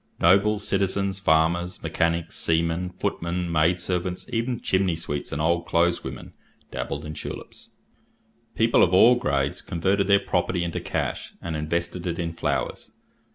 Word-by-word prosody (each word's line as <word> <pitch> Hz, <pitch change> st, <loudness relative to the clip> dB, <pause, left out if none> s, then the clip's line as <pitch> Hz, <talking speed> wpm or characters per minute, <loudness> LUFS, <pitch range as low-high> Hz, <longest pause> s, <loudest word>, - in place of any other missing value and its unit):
Nobles, 100 Hz, +4 st, +3 dB
citizens, 100 Hz, 0 st, 0 dB
farmers, 85 Hz, +1 st, +1 dB
mechanics, 85 Hz, +1 st, 0 dB
sea 80 Hz, 0 st, +2 dB
men, 85 Hz, +2 st, -2 dB
footmen, 90 Hz, -1 st, -3 dB
maid 85 Hz, +2 st, +3 dB
servants, 90 Hz, 0 st, -2 dB
even 115 Hz, +1 st, -1 dB
chimney 95 Hz, -2 st, +1 dB
sweeps 75 Hz, -3 st, -4 dB
and 70 Hz, -, -3 dB
old 85 Hz, +2 st, +1 dB
clothes 85 Hz, +1 st, +2 dB
women, -, -, -8 dB, 0.4 s
dabbled 75 Hz, +3 st, -4 dB
in 75 Hz, -, -6 dB
tulips. -, -, -8 dB, 0.9 s
People -, -, +4 dB
of 90 Hz, -, +4 dB
all 115 Hz, +6 st, +8 dB
grades 70 Hz, -, -1 dB
converted 95 Hz, +4 st, 0 dB
their 100 Hz, -1 st, +5 dB
property 90 Hz, -2 st, -1 dB
into 85 Hz, -1 st, -3 dB
cash, -, -, -3 dB
and 80 Hz, -2 st, -4 dB
invested 85 Hz, +3 st, -2 dB
it 85 Hz, -1 st, -2 dB
in 85 Hz, -1 st, -3 dB
flowers. -, -, -3 dB
85 Hz, 150 wpm, -25 LUFS, 80-95 Hz, 0.9 s, all